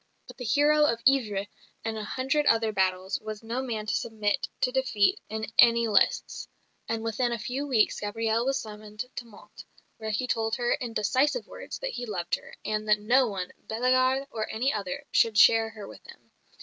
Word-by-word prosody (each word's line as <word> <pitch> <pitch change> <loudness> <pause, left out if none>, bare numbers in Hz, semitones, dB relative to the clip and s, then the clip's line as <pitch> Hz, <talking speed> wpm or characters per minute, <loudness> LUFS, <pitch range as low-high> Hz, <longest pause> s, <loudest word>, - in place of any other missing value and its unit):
But - - -13
the 250 - -6
hero 295 +4 +4
of 230 -4 0
Ivry 210 -7 +2 0.4
and 225 0 -2
a 215 - -4
hundred 265 +7 -1
other 225 -1 +3
battles 190 -1 0
was 215 0 -7
no 235 +3 -3
man 225 -5 -4
to 210 - -2
submit 220 +3 -1
to 250 - +2
defeat 265 - +1
in 220 0 -3
any 235 0 +6
lists; 210 -2 +1 0.4
and 225 -1 -2
within 235 +2 0
a 235 - -1
few 255 +6 -4
weeks 235 -6 +2
Gabrielle 225 +2 -1
was 270 +1 +1
summoned 215 -1 -7
to 240 - -5
Mantes, 210 -3 -14 0.3
where 220 -1 -5
he 220 +4 -1
told 225 -2 0
her 240 -1 -1
in 245 -4 -4
decisive 260 - +1
words - - -8
that - - -4
he 245 - -5
loved 175 -5 -4
her, - - -3
and 215 0 -2
that 210 0 +4
no 245 +5 +3
one, 190 -4 -5
Bellegarde 255 +3 +2
or 220 -1 -3
any 250 +5 0
other, 200 -4 -4
should 225 -2 +3
share 225 +1 +6
her 210 -2 -10
with - - -13
him. - - -16
225 Hz, 195 wpm, -27 LUFS, 215-255 Hz, 0.4 s, any